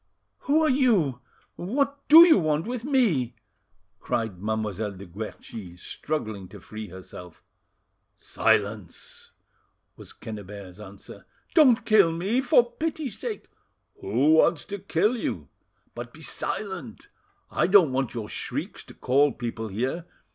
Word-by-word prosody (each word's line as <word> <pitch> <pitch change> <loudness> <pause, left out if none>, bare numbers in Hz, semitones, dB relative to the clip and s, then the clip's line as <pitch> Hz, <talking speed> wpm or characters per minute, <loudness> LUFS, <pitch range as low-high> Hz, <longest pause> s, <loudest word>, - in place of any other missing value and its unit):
"Who 310 +3 +3
are - - +3
you? 210 - +2 0.4
What 280 +9 -2
do 325 +3 +11
you 320 - +6
want 155 0 0
with 240 0 -4
me?" 200 - +1 0.6
cried 110 -7 -3
Mademoiselle 105 -1 -2
de 95 +1 -10
Guerchi, 95 -1 -8
struggling 110 -5 -4
to - - -12
free 110 0 -8
herself. 90 -1 -11 0.7
"Silence!" 100 -3 -1 0.7
was - - -12
Quennebert's 100 -3 -9
answer. 100 -1 -12 0.3
"Don't 250 -8 +5
kill 215 -7 +5
me, 195 +10 0
for 245 -4 +4
pity's 310 -8 -4
sake!" 455 -3 -5 0.5
"Who 125 +10 +2
wants 160 -1 +3
to 200 0 -6
kill 200 +5 +1
you? 80 - -4 0.4
But 120 0 -8
be 160 - -13
silent; 190 - -5 0.4
I - - +1
don't 185 -7 +6
want 130 -1 -2
your 110 -3 -4
shrieks - - -5
to - - -14
call 140 +3 +3
people 115 -2 -5
here. 130 - -3
140 Hz, 130 wpm, -26 LUFS, -, 0.7 s, do